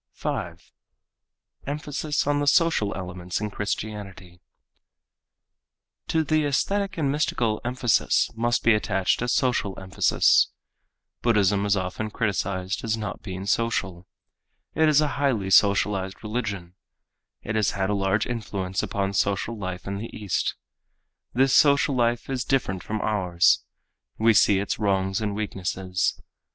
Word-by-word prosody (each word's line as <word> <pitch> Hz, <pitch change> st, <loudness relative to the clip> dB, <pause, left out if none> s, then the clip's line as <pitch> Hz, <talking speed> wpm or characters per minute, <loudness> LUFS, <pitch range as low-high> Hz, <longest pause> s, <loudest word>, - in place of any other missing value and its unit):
5. -, -, -5 dB, 1.0 s
Emphasis 150 Hz, +1 st, -2 dB
on 145 Hz, 0 st, +1 dB
the 145 Hz, -, -1 dB
Social 160 Hz, -10 st, +3 dB
Elements 90 Hz, -1 st, -5 dB
in 105 Hz, 0 st, -3 dB
Christianity 100 Hz, -4 st, -5 dB, 1.7 s
To 160 Hz, -1 st, +1 dB
the 155 Hz, 0 st, +1 dB
aesthetic 195 Hz, +7 st, 0 dB
and 145 Hz, -4 st, +1 dB
mystical 120 Hz, -7 st, 0 dB
emphasis 125 Hz, -2 st, +1 dB
must 120 Hz, +1 st, 0 dB
be 115 Hz, -, +5 dB
attached 100 Hz, -3 st, 0 dB
a 125 Hz, -, -1 dB
social 120 Hz, -5 st, 0 dB
emphasis. 95 Hz, 0 st, +3 dB, 0.7 s
Buddhism 105 Hz, -3 st, +2 dB
is 100 Hz, 0 st, +2 dB
often 95 Hz, +4 st, -3 dB
criticized 100 Hz, -3 st, -2 dB
as 110 Hz, -1 st, 0 dB
not 105 Hz, -1 st, -5 dB
being 95 Hz, -1 st, -6 dB
social. 100 Hz, -5 st, -1 dB, 0.7 s
It 160 Hz, -1 st, +3 dB
is 150 Hz, 0 st, +5 dB
a 150 Hz, -, +2 dB
highly 110 Hz, -9 st, +1 dB
socialized 100 Hz, -1 st, +2 dB
religion. 105 Hz, -6 st, -4 dB, 0.7 s
It -, -, -3 dB
has 110 Hz, -3 st, +2 dB
had 95 Hz, +1 st, 0 dB
a -, -, +1 dB
large 100 Hz, +1 st, +1 dB
influence 95 Hz, -5 st, -3 dB
upon 100 Hz, -1 st, -2 dB
social 100 Hz, +4 st, 0 dB
life 95 Hz, -3 st, -6 dB
in 100 Hz, 0 st, -4 dB
the 115 Hz, -, -6 dB
East. 105 Hz, -4 st, -1 dB, 0.8 s
This 135 Hz, +1 st, +3 dB
social 140 Hz, -1 st, +5 dB
life 120 Hz, -1 st, 0 dB
is 130 Hz, -2 st, -2 dB
different 95 Hz, -9 st, -1 dB
from 110 Hz, 0 st, -4 dB
ours. 90 Hz, -5 st, +2 dB, 0.5 s
We 115 Hz, +1 st, +4 dB
see 100 Hz, -1 st, +5 dB
its 100 Hz, +1 st, -2 dB
wrongs 95 Hz, 0 st, 0 dB
and 105 Hz, -2 st, -2 dB
weaknesses. 95 Hz, -3 st, -2 dB
105 Hz, 135 wpm, -25 LUFS, 95-120 Hz, 1.7 s, be